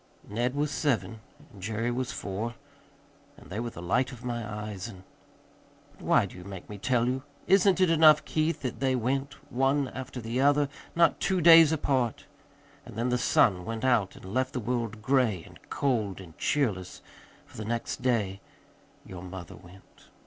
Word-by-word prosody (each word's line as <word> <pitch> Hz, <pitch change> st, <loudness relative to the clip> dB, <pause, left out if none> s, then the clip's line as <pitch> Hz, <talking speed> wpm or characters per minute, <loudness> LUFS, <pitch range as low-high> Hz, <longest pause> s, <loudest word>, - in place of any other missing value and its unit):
"Ned 120 Hz, +5 st, -1 dB
was 145 Hz, 0 st, 0 dB
seven 120 Hz, -7 st, -1 dB, 0.3 s
and 100 Hz, -, -13 dB
Jerry 110 Hz, +4 st, -2 dB
was 125 Hz, +1 st, -2 dB
four, 105 Hz, +4 st, -4 dB, 0.8 s
and -, -, -16 dB
they 105 Hz, -, -3 dB
were 120 Hz, 0 st, -3 dB
the 85 Hz, -6 st, -10 dB
light 125 Hz, +9 st, +1 dB
of 125 Hz, -1 st, -11 dB
my 120 Hz, -1 st, -2 dB
eyes, 105 Hz, -1 st, -5 dB
and 95 Hz, -5 st, -11 dB, 0.9 s
But -, -, -20 dB
why -, -, +3 dB
do -, -, -11 dB
you 90 Hz, -, -10 dB
make 95 Hz, -1 st, -9 dB
me 105 Hz, -1 st, -8 dB
tell 120 Hz, +1 st, +1 dB
you? 130 Hz, +2 st, -1 dB, 0.2 s
Isn't 195 Hz, -1 st, +4 dB
it 185 Hz, -3 st, +4 dB
enough, 155 Hz, -2 st, +6 dB
Keith, 155 Hz, 0 st, -1 dB
that 125 Hz, -, -3 dB
they 130 Hz, -1 st, +1 dB
went, 135 Hz, +4 st, -1 dB, 0.2 s
one 135 Hz, +2 st, +1 dB
after 130 Hz, 0 st, -7 dB
the 115 Hz, +2 st, -2 dB
other, 145 Hz, 0 st, +3 dB, 0.3 s
not 170 Hz, -2 st, +4 dB
two 190 Hz, -1 st, +1 dB
days 165 Hz, -2 st, +8 dB
apart? 130 Hz, -6 st, 0 dB, 0.6 s
And 120 Hz, -4 st, -12 dB
then 120 Hz, +3 st, -1 dB
the 125 Hz, 0 st, +1 dB
sun 90 Hz, -6 st, +3 dB
went 115 Hz, +4 st, -4 dB
out 115 Hz, -7 st, +2 dB
and -, -, -13 dB
left 130 Hz, +7 st, -1 dB
the 125 Hz, -, -2 dB
world 115 Hz, -2 st, -3 dB
gray 120 Hz, -8 st, +2 dB
and -, -, -15 dB
cold 110 Hz, -9 st, -1 dB
and 85 Hz, -4 st, -12 dB
cheerless, 105 Hz, -11 st, -1 dB, 0.4 s
for -, -, -19 dB
the 110 Hz, -, -4 dB
next 115 Hz, +1 st, -3 dB
day 105 Hz, -6 st, 0 dB, 0.6 s
your 90 Hz, -2 st, -9 dB
mother 90 Hz, -2 st, -8 dB
went." 95 Hz, +1 st, -18 dB
120 Hz, 180 wpm, -28 LUFS, 105-135 Hz, 0.9 s, days